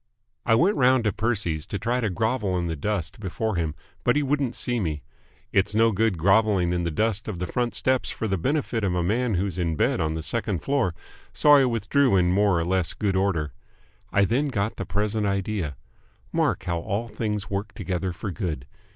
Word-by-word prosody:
I 115 - +5
went 185 - +3
round 130 -2 +4
to 105 - +1
Percy's 100 -8 -1
to 105 - -3
try 120 +4 0
to 110 - 0
grovel 105 -1 0
in 90 - -1
the 80 -1 -2
dust 105 - -3
before 110 +2 -2
him, 80 -3 -1 0.3
but - - +3
he 150 - +2
wouldn't 140 -3 0
see 120 -1 -1
me. 80 -7 -2 0.5
It's 100 +2 +1
no 115 +1 +5
good 105 -2 +1
grovelling 95 0 +3
in 90 - 0
the 85 - -1
dust 110 +5 -1
of 105 -5 -4
the 90 - -2
front 120 +6 -1
steps 130 -1 +1
for 110 - -3
the 95 - 0
benefit 125 - -1
of 90 -3 +1
a 90 - +1
man 115 +4 +1
who's 95 0 -1
in 85 -2 0
bed - - +1
on 80 0 0
the 80 0 -4
second 105 -2 -2
floor, 135 -11 +1 0.4
so 150 - +5
I 140 -2 +7
withdrew 120 +1 +2
in 90 -1 +3
more 100 -2 +3
or 85 - -1
less 90 -1 0
good 100 -3 0
order. 85 -7 0 0.6
I 100 0 +4
then 130 +8 +1
got 110 -5 -2
the 95 - -4
present 105 +3 0
idea. 100 -6 -2 0.6
Mark - - +1
how 85 -1 -1
all 105 +6 -2
things 105 -2 -3
work 100 +2 -2
together 95 0 -2
for 95 +4 -5
good. 80 - -4
100 Hz, 210 wpm, -25 LUFS, 90-115 Hz, 0.6 s, I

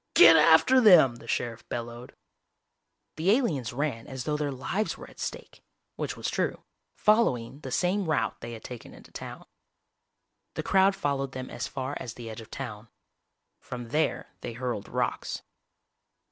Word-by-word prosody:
"Get 165 -1 +10
after 160 +12 +6
them!!" 160 - +7
the - - -14
sheriff 120 -1 -3
bellowed. 120 +1 -6 1.0
The 165 +4 +1
aliens 170 - +2
ran 130 -3 -2
as 130 -2 -5
though 150 - -1
their 150 -1 -1
lives 180 +11 -2
were - - -10
at - - -17
stake, - - -6 0.3
which - - -4
was - - -3
true, - - -1 0.3
following 140 - +2
the 135 - -7
same 185 +8 +1
route 115 -8 0
they 120 - -6
had 110 - -9
taken 125 -2 -9
into - - -16
town. - - -8 1.1
The - - -3
crowd 195 0 +4
followed 135 -4 -1
them 130 0 -6
as 125 - -4
far 135 +1 -4
as 120 - -7
the 115 -2 -7
edge 110 - -8
of 110 - -13
town. 115 -4 -7 0.7
From 120 -2 -7
there 155 +4 0
they 120 - -5
hurled 120 -4 -3
rocks. - - -2
135 Hz, 160 wpm, -28 LUFS, 120-160 Hz, 1.1 s, Get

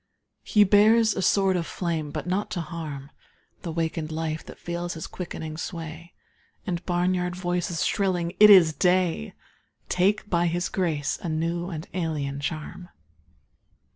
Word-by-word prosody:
He 210 - +4
bears 215 +2 +5
a - - -1
sword 190 0 +3
of 170 -2 -1
flame 165 -4 -3
but - - -5
not 190 +4 -1
to - - 0
harm 150 -5 -7 0.5
The 170 - -5
wakened 160 -1 -2
life 160 0 -3
that - - -10
feels 175 0 -4
his 160 - -6
quickening 160 -3 -6
sway 165 0 -7 0.5
And 175 -2 -3
barnyard 180 0 0
voices 175 -1 -1
shrilling 180 -3 0
"It 210 0 +9
is 175 -6 +8
day!" 180 - +1 0.5
Take 200 +4 +1
by 175 -3 +1
his 175 +1 -1
grace 160 -6 -1
a 175 - -4
new 170 +3 -2
and 160 -3 -6
alien 150 -6 -2
charm. 155 +4 -5
175 Hz, 145 wpm, -25 LUFS, 160-185 Hz, 0.5 s, It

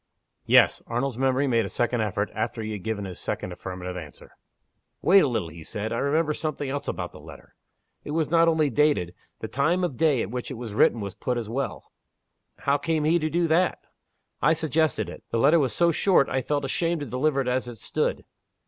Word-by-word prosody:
"Yes." - - +5
Arnold's 120 +1 -2
memory 135 +1 +2
made 115 -4 +2
a 100 - -4
second 120 -1 0
effort, 105 -1 -1
after 110 +1 -3
he 110 - -4
had 105 -2 -5
given 110 -2 -3
his 90 -2 -7
second 90 - -3
affirmative 90 0 -6
answer. 80 -5 -10 0.7
"Wait 195 +4 +7
a 165 - +3
little," 110 -10 -2
he 80 0 -11
said. 105 +6 -4
"I 115 - -1
remember 150 +2 +1
something 150 -2 -3
else 145 +1 -4
about - - -3
the - - -13
letter. - - -13 0.5
It - - -9
was 155 0 0
not 165 0 +4
only 155 -3 +2
dated. 120 - +2 0.3
The - - -3
time 155 +7 +1
of 145 -9 -2
day 150 -7 +3
at 100 - -6
which 125 0 -4
it 130 - -5
was 115 -3 -7
written 110 +1 +3
was 100 -2 -5
put 125 -1 -2
as 115 -3 -4
well." 135 +4 -4 0.7
"How 140 +1 +2
came 160 0 0
he 165 +3 +3
to 155 0 -1
do 170 +2 +1
that?" 175 +3 +2 0.6
"I 150 +4 +5
suggested 160 - 0
it. 90 - -10
The - - -1
letter 145 +8 +5
was 135 -4 +1
so 170 0 +3
short 180 -2 +3
I 130 - 0
felt 145 +2 -1
ashamed 165 +4 -1
to - - -3
deliver 135 +3 0
it 135 - -1
as 125 0 0
it 120 -2 -8
stood. - - -2
135 Hz, 220 wpm, -25 LUFS, 110-155 Hz, 0.7 s, Wait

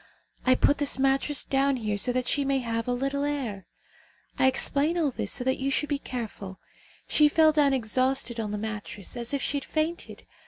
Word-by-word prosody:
I 255 - +6
put 285 - +2
this 290 -2 +1
mattress 270 +2 +2
down 275 0 +1
here 215 -3 -2
so 205 +5 +1
that 250 0 -2
she 285 - +2
may 275 0 +1
have 230 -2 -3
a - - 0
little 275 +3 -1
air. 245 -11 -3 0.7
I 265 - +5
explain 285 +5 +1
all 310 -5 +1
this - - -3
so 250 - -2
that 260 +1 0
you 270 +1 -1
should 285 +2 -1
be 285 -2 -1
careful. 215 -8 -7 0.5
She 300 -1 +4
fell 315 +1 +5
down 295 -2 +3
exhausted 255 0 +1
on 215 -2 -2
the 210 - -3
mattress 210 -2 -5
as 235 -1 -4
if 280 -2 -1
she 285 - 0
had 280 - -5
fainted. 320 +2 -3
265 Hz, 205 wpm, -27 LUFS, 235-285 Hz, 0.7 s, I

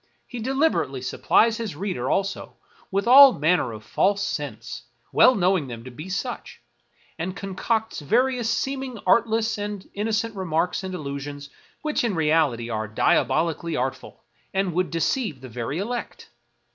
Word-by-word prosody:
He 245 - -7
deliberately 260 - 0
supplies 225 - +2
his 220 -8 -4
reader, 170 -8 -3
also, 195 0 -2 0.3
with 200 +2 -1
all 265 +2 +9
manner 155 -4 +1
of 110 -1 -9
false 200 - +1
scents, - - -5 0.3
well 255 - +6
knowing 180 -5 +2
them 115 -2 -8
to 130 - -9
be 155 +9 -9
such; 230 +6 -5 0.6
and 180 +3 -3
concocts 215 +3 -2
various 240 - +1
seeming 265 -2 -2
artless 225 +2 +2
and 205 -1 -5
innocent 220 +2 -1
remarks 180 0 -1
and 185 -1 -4
allusions, 140 -2 -6 0.3
which 305 -4 0
in 225 -5 0
reality 150 -7 +2
are 110 -2 -3
diabolically 160 +8 +1
art 130 +1 0
ful, - - -15 0.3
and 190 -2 0
would 180 +2 0
deceive 165 - -1
the 130 0 -10
very 120 +5 -4
elect. 235 +6 -5
190 Hz, 145 wpm, -24 LUFS, 145-225 Hz, 0.6 s, all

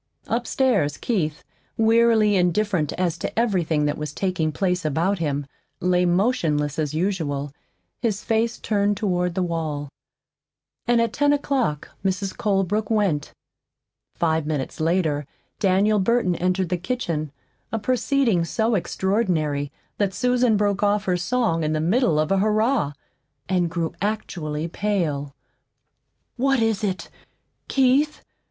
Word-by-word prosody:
Upstairs, 235 - +1
Keith, 155 -10 -1 0.3
wearily 225 -2 +4
indifferent 180 -3 +1
as 175 -2 -1
to - - -4
everything 175 -10 +1
that 150 0 -1
was 150 -1 -4
taking 170 -3 -1
place 180 +1 0
about 165 +6 0
him, 145 -3 -1 0.3
lay 180 0 +2
motionless 170 - +1
as 155 -1 -1
usual, 155 -6 -1 0.5
his 215 -3 -1
face 225 +1 0
turned 205 -1 0
toward 180 -4 0
the 185 - +1
wall. 155 -4 -3 1.0
And 240 -1 +4
at 230 -1 +1
ten 290 0 +3
o'clock 265 - -1
Mrs. 190 0 -1
Colebrook 205 +1 0
went. 195 -10 +1 0.8
Five 160 -2 0
minutes 145 -4 -3
later 160 -3 +1 0.3
Daniel 205 +2 +3
Burton 195 -2 +2
entered 185 0 0
the 180 - 0
kitchen 170 - -3 0.4
a 225 - 0
proceeding 250 -4 +1
so 220 +7 0
extraordinary 170 -7 0 0.3
that 195 -2 0
Susan 250 -3 +2
broke 200 -1 +1
off 205 0 +2
her 180 - +1
song 180 -2 0
in 155 0 0
the 155 - 0
middle 180 - +2
of 155 +3 0
a 195 - +3
"Hurrah" 215 - +2 0.5
and 180 -2 +1
grew 165 -1 -2
actually 170 -7 -2
pale. 165 -8 -2 1.0
"What 270 +1 +2
is 225 -3 +1
it? 190 -2 -2 0.6
KEITH? 275 +3 +2
185 Hz, 130 wpm, -23 LUFS, 160-220 Hz, 1.0 s, wearily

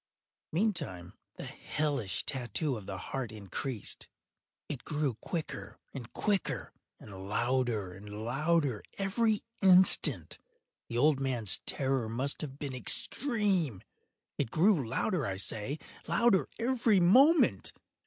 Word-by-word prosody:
Meantime 155 - -1 0.2
the - - -7
hellish 140 -10 -2
tattoo 130 +3 -1
of 105 -4 -9
the 95 - -4
heart 125 +4 -4
increased. 110 +3 -4 0.6
It 135 -5 -6
grew 150 -4 -1
quicker 165 -3 -5 0.2
and 125 -4 -8
quicker, 205 -3 -1 0.3
and 95 -2 -10
louder 120 -4 0
and 105 +3 -8
louder 140 -1 +1 0.2
every 210 +2 +1 0.2
instant. 185 -1 +5 0.5
The 120 - -3
old 145 +2 +4
man’s 125 -7 +1
terror 135 -4 0
must 130 +5 -1
have 140 -3 -6
been 140 -2 -5
extreme! 185 - 0 0.6
It - - 0
grew 160 - +3
louder, 150 - 0
I 95 -1 -3
say, 105 +8 -2 0.3
louder 235 -5 +3
every 230 -4 +2
moment! 265 - +5
135 Hz, 115 wpm, -31 LUFS, 110-185 Hz, 0.6 s, instant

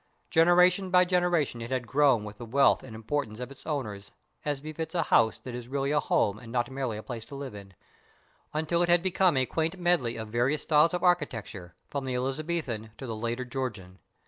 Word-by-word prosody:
Generation 180 +3 +5
by 180 0 +5
generation 175 -8 +1
it 115 - -6
had 130 -2 -1
grown 135 -3 +3
with 105 +1 -9
the 120 - -6
wealth 135 +4 +4
and 115 -4 -10
importance 110 -1 -3
of 125 +2 -6
its 140 - -14
owners, 105 -10 -4 0.3
as 145 -2 -1
befits 155 +3 -6
a 170 - +2
house 110 -6 +3
that 125 - -9
is 120 -1 -6
really 140 +1 -1
a 150 - +3
home 105 -6 +1
and 115 0 -11
not 120 0 -1
merely 130 -5 -3
a 110 - -7
place 120 -4 -6
to 140 - -10
live 140 -3 -6
in, 100 -2 -11 0.8
until 160 +3 0
it 175 - +2
had 175 0 +4
become 185 -4 +3
a 130 - +3
quaint 160 +6 -2
medley 175 -10 +1
of 110 -1 -6
various 125 +6 +1
styles 160 +3 +4
of 180 - -3
architecture 115 - -1
from 140 -2 -4
the 130 -1 -2
Elizabethan 135 -3 -2
to 135 - -7
the 115 -3 -4
later 120 +3 -3
Georgian. 105 -8 -5
135 Hz, 210 wpm, -28 LUFS, 115-160 Hz, 0.8 s, Generation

